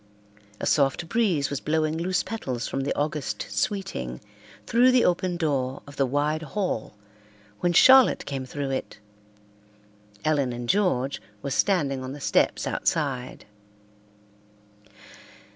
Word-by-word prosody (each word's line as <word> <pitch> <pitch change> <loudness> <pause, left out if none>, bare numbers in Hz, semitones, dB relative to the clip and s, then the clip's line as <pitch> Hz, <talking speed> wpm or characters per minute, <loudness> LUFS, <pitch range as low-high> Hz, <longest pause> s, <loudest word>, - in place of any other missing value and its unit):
A - - -3
soft 140 +3 +2
breeze 185 -11 +1
was 140 - -2
blowing 155 +1 0
loose 180 +2 0
petals 130 - -4
from 135 - -2
the 135 - -2
August 145 -8 -2
Sweeting 105 - -2 0.5
through 245 +3 +4
the 255 -1 +4
open 180 0 +1
door 135 -5 -1
of 145 0 -13
the 135 - +2
wide 145 +4 0
hall 160 - -3 0.6
when 175 - +1
Charlotte 260 +9 +6
came 135 -2 -4
through 135 +1 -4
it. 130 - -4 1.3
Ellen 140 -5 +1
and 120 0 -6
George 140 - +1 0.2
were 140 - -3
standing 140 -6 +1
on 130 +1 -6
the 145 - -8
steps - - +1
outside. 135 -6 -2
145 Hz, 125 wpm, -25 LUFS, 135-175 Hz, 1.3 s, Charlotte